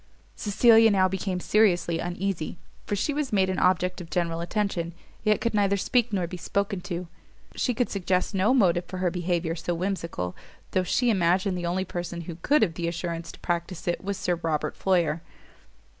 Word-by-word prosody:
Cecilia 225 +2 +5
now 190 -2 +4
became 190 0 -2
seriously 175 -5 +2
uneasy; 175 -1 -3 0.3
for 205 - 0
she 290 +9 0
was 295 -2 -2
made 190 -2 +2
an 185 - -2
object 180 0 +2
of 165 - -10
general 170 -2 -1
attention, 175 -3 -2 0.3
yet 215 -1 +3
could 235 - -1
neither 200 -1 +2
speak 240 +3 +1
nor 190 -4 0
be 180 +2 -6
spoken 200 +2 -1
to. 175 -1 -5 0.5
She 250 - 0
could 245 +1 0
suggest 185 -1 0
no 195 +4 +3
motive 180 -9 +3
for 180 0 -2
behaviour 175 -2 -1
so 175 +1 -2
whimsical, 170 - -3 0.4
though 185 - +2
she 240 +6 +2
imagined 185 0 +2
the 175 -1 -2
only 185 +2 0
person 175 -2 -5
who 165 -1 -7
could 285 - +3
have 175 -6 +1
the 170 0 -3
assurance 170 -1 -4
to - - -14
practise 170 0 -3
it 175 - -1
was 200 0 -2
Sir 180 -2 0
Robert 155 -2 -1
Floyer. 170 -4 +1
180 Hz, 185 wpm, -26 LUFS, 170-200 Hz, 0.5 s, Cecilia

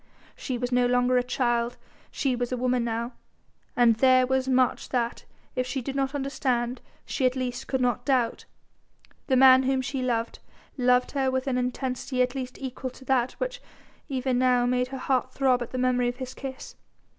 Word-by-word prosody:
she 255 -3 -4
was 245 +1 -3
no 250 0 +3
longer 250 +1 +2
a - - -1
child, 240 -1 0 0.3
she 265 -3 -1
was 245 0 -3
a 255 - -1
woman 250 0 +1
now, 235 +1 -2 0.6
and 235 -2 +4
there 255 +1 +5
was 265 0 0
much 255 -1 +1
that 240 -2 -2 0.3
if 255 0 -1
she 265 +2 -2
did 270 +2 -5
not 275 +1 -1
understand 260 -3 -1 0.2
she 270 - -3
at 255 0 +3
least 250 -1 -3
could 265 -1 -1
not 245 -1 +1
doubt. 250 -3 0 0.8
The 265 - +3
man 260 0 +8
whom 265 0 0
she 275 0 -3
loved, 235 -2 -1 0.4
loved 250 -1 +2
her 270 -2 +1
with 260 0 -1
an 255 -2 0
intensity 255 0 -1
at 250 0 -2
least 255 -2 -5
equal 260 0 -5
to 265 +1 -15
that 260 -2 +1
which - - -4 0.5
even 255 -2 0
now 250 -1 +3
made 250 0 +1
her 265 +1 -6
heart 255 -1 -1
throb 260 -2 +2
at 240 - -4
the 255 - -5
memory 250 -1 +2
of 245 - -6
his 260 -1 -6
kiss. 265 -1 -8
255 Hz, 190 wpm, -26 LUFS, 245-265 Hz, 0.8 s, man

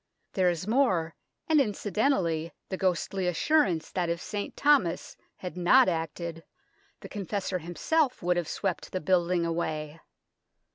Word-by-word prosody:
There 185 -2 +3
is 175 0 -2
more, 200 -10 +2 0.3
and 310 -2 +5
incidentally 195 - 0 0.2
the 190 - -2
ghostly 185 0 0
assurance 180 - +1
that 175 -2 -1
if 170 0 -1
St. 205 +2 -5
Thomas 280 - +2 0.2
had 180 -1 -7
not 185 +9 +5
acted, 165 -1 -3 0.6
the - - -8
Confessor 195 -2 -3
himself 250 - 0
would 180 0 +2
have 175 -3 -1
swept 195 - -3
the 185 - 0
building 175 0 +2
away. 160 -2 -3
180 Hz, 135 wpm, -28 LUFS, 170-205 Hz, 0.6 s, and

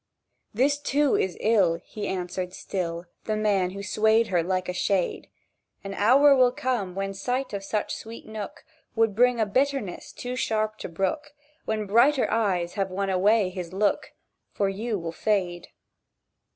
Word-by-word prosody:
"This, 280 +6 +2
too, 290 -1 +2
is 185 -3 -1
ill," 200 -7 +3
He 210 - -5
answered 180 0 -3
still, 170 -2 -4 0.2
The 215 - 0
man 205 -4 +1
who 200 +2 -7
swayed 220 +2 +2
her 175 -2 +2
like 185 +2 -1
a 180 - -2
shade. 185 0 -1 0.5
"An 195 0 -5
hour 275 +7 +6
will 255 -2 +5
come 240 -8 -2
when 195 0 -2
sight 250 +6 -2
of 200 -1 -4
such 210 +1 -2
sweet 225 +1 -9
nook 215 -2 -7 0.3
Would 225 -2 +2
bring 245 +1 +4
a 220 - +3
bitterness 260 -3 -1
too 250 0 -5
sharp 215 -3 -1
to - - -6
brook, 285 - -2 0.3
When 215 -1 -1
brighter 245 +7 +4
eyes 185 -6 0
have 195 -2 -1
won 195 +1 -2
away 200 +2 +3
his 180 -2 -7
look; 205 +2 0 0.4
For 200 -1 +1
you 215 +3 -2
will 165 -2 -4
fade." 180 -2 -1
205 Hz, 165 wpm, -26 LUFS, 185-230 Hz, 0.5 s, hour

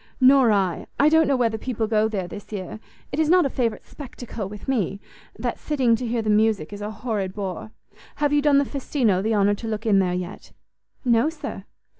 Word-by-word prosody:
"Nor 260 -2 +6
I; 190 -4 0
I 290 - +6
don't 320 0 +4
know 275 - +3
whether 230 -3 0
people 235 -3 -2
go 215 0 +2
there 195 -5 -3
this 205 +4 -10
year. 200 0 -6 0.3
It 285 - -3
is 315 -1 +2
not 360 -1 +5
a 275 - -1
favourite 230 -4 -2
spectacle 240 -7 -8
with 210 -1 -10
me; 205 -7 -1 0.4
that - - -3
sitting 260 -6 +2
to 250 - -4
hear 230 0 -1
the 215 - -1
music 210 -5 +2
is 205 - -7
a 205 - -3
horrid 215 -4 -3
bore. 195 0 -5 0.5
Have 290 0 0
you 295 - +4
done 290 -1 +4
the 280 - +3
Festino 250 -8 0
the 220 +2 0
honour 205 0 +3
to 225 +3 -6
look 220 +1 -4
in 205 -3 +4
there 180 -2 +1
yet?" 180 +1 -7 0.5
"No, 240 +4 +3
sir." 290 -11 -7
220 Hz, 215 wpm, -23 LUFS, 205-270 Hz, 0.5 s, Nor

